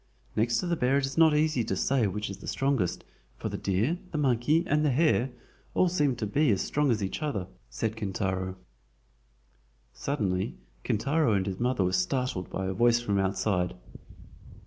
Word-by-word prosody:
"Next 115 +2 +2
to - - -3
the 175 -1 +1
bear 135 -2 +2
it 140 - +1
is 135 0 -5
not 160 -2 +5
easy 155 -5 +2
to 100 - -2
say 125 +3 +2
which 105 +2 -3
is 100 - -7
the - - -11
strongest, 135 -10 0 0.3
for - - -4
the - - -5
deer, 110 - 0
the 155 - -3
monkey, 145 +3 +2
and 150 +1 +2
the 150 - +3
hare 135 -2 +2 0.5
all 185 - +4
seem 150 -7 +1
to 110 - -3
be 140 +8 +2
as 100 -4 +2
strong 150 -1 +1
as 110 -4 +1
each 95 - -3
other," 115 -12 -2 0.2
said 110 - -2
Kintaro. 95 -3 -2 1.4
Suddenly 95 - -2 0.3
Kintaro 140 +2 +1
and 95 -2 +1
his 95 -1 -4
mother 125 -4 +1
were 90 0 0
startled 130 - -1
by 95 - -3
a 95 - -1
voice 120 +4 +4
from 100 -4 0
outside. 95 -2 0
120 Hz, 185 wpm, -28 LUFS, 95-145 Hz, 1.4 s, not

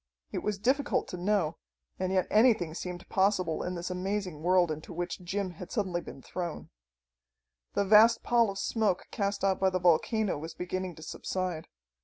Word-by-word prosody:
It - - -3
was 210 -1 -1
difficult 275 +7 +1
to - - -5
know, 175 -4 0 0.4
and 185 0 -1
yet 185 -2 +2
anything 215 -8 +4
seemed 180 +1 -6
possible 190 -4 +1
in 180 0 -3
this 175 +1 -4
amazing 185 -3 -3
world 175 -1 +3
into 155 0 -6
which 175 +1 -3
Jim 190 +1 -2
had 175 +1 -10
suddenly 185 -6 -1
been 135 - -11
thrown. 175 -3 -5 1.0
The 200 - +2
vast 220 +3 +6
pall 235 -2 +3
of 195 - -5
smoke 205 -2 0
cast 200 -2 -2
out 195 -1 +2
by 190 - +4
the 185 - 0
volcano 180 +2 +2
was 160 +2 -7
beginning 180 0 -4
to 160 - -11
subside. 180 0 -3
185 Hz, 175 wpm, -30 LUFS, 175-205 Hz, 1.0 s, vast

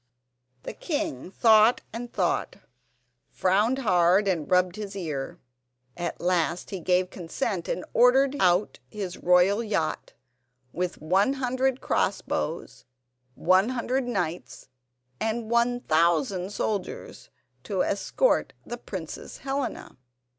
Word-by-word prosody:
The - - -6
king 205 - -3
thought 220 +2 +5
and 235 +1 -6
thought, - - -1 0.7
frowned 210 +7 +1
hard 185 -4 +3
and 170 -6 -1
rubbed 180 0 +3
his 210 -2 -6
ear. 155 -8 -4 0.6
At 175 -1 -4
last 175 -1 0
he 195 - -4
gave 180 +2 +1
consent, 180 +1 -3
and 180 - -3
ordered 265 +3 +4
out 180 +2 +2
his 195 -4 -6
royal 180 +5 +4
yacht, 200 -8 -2 0.6
with 180 0 -2
100 255 - +1
cross - - 0
bows, - - -4 0.5
100 240 - +1
knights, 180 -7 -4 0.5
and 225 0 -2
1,000 195 - +2
soldiers, 205 -2 -4 0.3
to 190 +2 -1
escort 200 - +1
the - - -6
Princess - - -7
Helena. 270 -2 -4
195 Hz, 105 wpm, -26 LUFS, 180-240 Hz, 0.7 s, thought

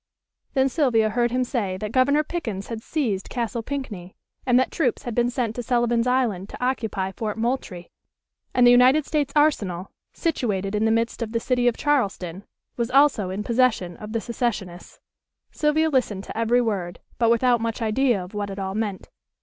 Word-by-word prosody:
Then 265 0 +4
Sylvia 240 -7 +2
heard 240 +1 +1
him 255 +2 0
say 210 -7 -2
that 210 +2 -5
Governor 280 +4 +3
Pickens 225 - -5
had 225 -2 -5
seized 225 -10 -2
Castle 235 -1 -2
Pinckney, 220 -9 -6 0.3
and 250 -1 +5
that 260 - 0
troops 265 -8 0
had 240 - -4
been 240 +1 +2
sent 240 -3 -2
to - - -1
Sullivan's 240 0 +1
Island 235 -7 0
to 250 - -4
occupy 205 -7 -3
Fort 215 0 -4
Moultrie, 225 -7 -3 0.6
and 245 - +4
the 245 - +8
United 255 +4 +5
States 295 -3 -1
Arsenal, 200 - +1 0.2
situated 210 - -1
in 210 +1 +1
the - - +3
midst 230 +2 0
of 225 -1 -3
the 230 - +1
city 245 +1 +1
of 240 - +2
Charleston, 200 - -1 0.3
was 235 -1 -1
also 270 -8 +4
in 195 +3 -3
possession 225 -7 +1
of 210 0 -8
the 230 0 -1
secessionists. 215 -7 -4 0.5
Sylvia 310 +1 +2
listened 220 -8 0
to - - -9
every 230 +2 +2
word, 195 -7 -2 0.2
but 230 -1 +3
without 235 0 +3
much 230 0 -2
idea 225 -2 +1
of 180 - -12
what 205 -1 -3
it 195 - -6
all 190 -1 -3
meant. 210 -2 -3
230 Hz, 185 wpm, -24 LUFS, 205-255 Hz, 0.6 s, the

